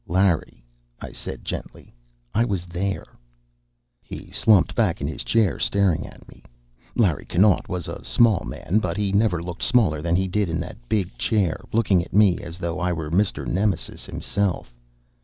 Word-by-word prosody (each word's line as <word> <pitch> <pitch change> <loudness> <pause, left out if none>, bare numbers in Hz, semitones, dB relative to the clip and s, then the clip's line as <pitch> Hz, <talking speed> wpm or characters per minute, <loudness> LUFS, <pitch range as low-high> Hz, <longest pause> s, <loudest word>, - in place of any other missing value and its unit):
"Larry," 90 -8 +1 0.3
I - - -8
said - - -8
gently, - - -7 0.4
"I 115 - +3
was 100 -7 -2
there." 95 +3 -3 1.0
He - - -10
slumped 100 -6 +4
back 105 -8 +1
in 70 - -3
his 70 -4 -4
chair, 105 - +2
staring 100 -5 +1
at - - -15
me. - - -16 0.5
Larry 95 -10 +2
Connaught 100 +2 +2
was 90 -2 -3
a - - -7
small 115 -5 +3
man, 100 +5 -1
but 110 - -2
he 100 -2 0
never 100 -4 +2
looked 90 +1 -7
smaller 95 -12 +3
than 85 +1 +1
he 95 +1 +1
did 100 0 0
in 80 - -1
that - - -10
big 95 -4 0
chair, 100 -8 +1
looking 100 -6 +3
at - - -14
me 100 -4 +5
as 85 +1 -8
though 85 -2 -3
I 90 0 0
were 80 -3 -4
Mr. 95 +4 +1
Nemesis 100 -1 -1
himself. 100 -10 -2
95 Hz, 175 wpm, -23 LUFS, 85-105 Hz, 1.0 s, me